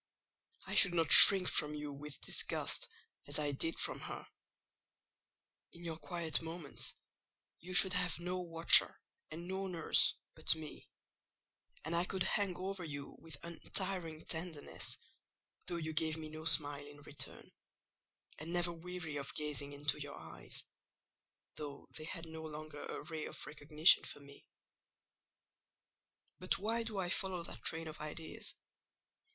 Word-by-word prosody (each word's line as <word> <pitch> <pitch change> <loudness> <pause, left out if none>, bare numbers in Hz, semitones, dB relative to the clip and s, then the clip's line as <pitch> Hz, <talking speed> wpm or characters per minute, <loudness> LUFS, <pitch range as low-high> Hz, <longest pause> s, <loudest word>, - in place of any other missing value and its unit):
I - - -5
should 175 - +6
not 165 -2 +1
shrink 190 -2 +12
from 150 0 +3
you 150 -1 -6
with 145 0 -10
disgust - - 0 0.4
as 145 - -1
I 150 -1 -1
did 165 +4 -3
from - - +2
her: - - -7 1.5
in 170 - -12
your 165 -2 -5
quiet 170 -3 -1
moments 160 -8 -3 0.6
you 185 +1 -6
should 190 -1 +7
have 180 -1 +1
no 180 +1 -3
watcher 165 -2 +4 0.3
and 170 +3 -8
no 190 +1 -3
nurse 170 -3 +2 0.2
but - - +4
me; 155 -1 -10 1.0
and 165 +2 -2
I 170 +1 +1
could 190 -1 -1
hang 195 -3 +1
over 190 0 -5
you 145 -3 -7
with 160 -3 -10
untiring 170 -1 -4
tenderness, 160 -2 -4 0.7
though 175 - -3
you 160 -1 -4
gave 160 0 -1
me 155 -1 -7
no 155 +1 -9
smile 145 -2 0
in 145 0 -14
return; 145 0 -8 0.9
and 160 +3 -6
never 175 0 +1
weary 170 -2 -7
of 140 -1 -6
gazing 150 -1 -2
into 145 +1 -2
your 145 0 -7
eyes, - - -9 0.9
though 145 -2 -8
they 155 - -6
had 165 0 -6
no 160 0 -8
longer 155 -1 -8
a - - -6
ray 160 0 -6
of - - -6
recognition 150 +2 +5
for - - -7 2.2
me.—But 185 - -1
why 225 +4 -2
do 225 -3 -5
I 180 -2 -2
follow 185 -2 -1
that - - -9
train 165 0 -2
of 155 - -9
ideas? 155 +1 -6
160 Hz, 145 wpm, -35 LUFS, 150-175 Hz, 2.2 s, shrink